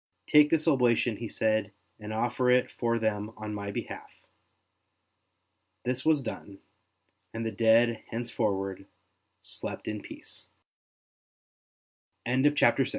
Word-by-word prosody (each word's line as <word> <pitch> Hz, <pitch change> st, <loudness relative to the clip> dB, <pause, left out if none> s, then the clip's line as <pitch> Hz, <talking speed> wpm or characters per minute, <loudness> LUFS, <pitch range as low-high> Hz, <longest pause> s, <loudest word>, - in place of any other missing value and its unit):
*' -, -, -50 dB
Take 150 Hz, 0 st, +6 dB
this 160 Hz, 0 st, +1 dB
oblation,'' 120 Hz, -6 st, +3 dB
he 115 Hz, -, -5 dB
said, 110 Hz, -1 st, 0 dB
'' -, -, -45 dB
and 105 Hz, 0 st, -7 dB
offer 120 Hz, +3 st, 0 dB
it 125 Hz, 0 st, +3 dB
for 115 Hz, -1 st, 0 dB
them 110 Hz, -2 st, -1 dB
on 105 Hz, 0 st, -5 dB
my 100 Hz, -1 st, -4 dB
behalf." -, -, -7 dB, 1.6 s
This 125 Hz, +1 st, -1 dB
was 155 Hz, -3 st, +3 dB
done; 100 Hz, -4 st, -7 dB, 0.8 s
and 115 Hz, 0 st, -3 dB
the 110 Hz, -, -1 dB
dead 115 Hz, +2 st, +4 dB
henceforward 100 Hz, -5 st, -2 dB, 0.6 s
slept -, -, -6 dB
in 105 Hz, -1 st, -3 dB
pea -, -, -11 dB
115 Hz, 115 wpm, -29 LUFS, 105-125 Hz, 1.6 s, Take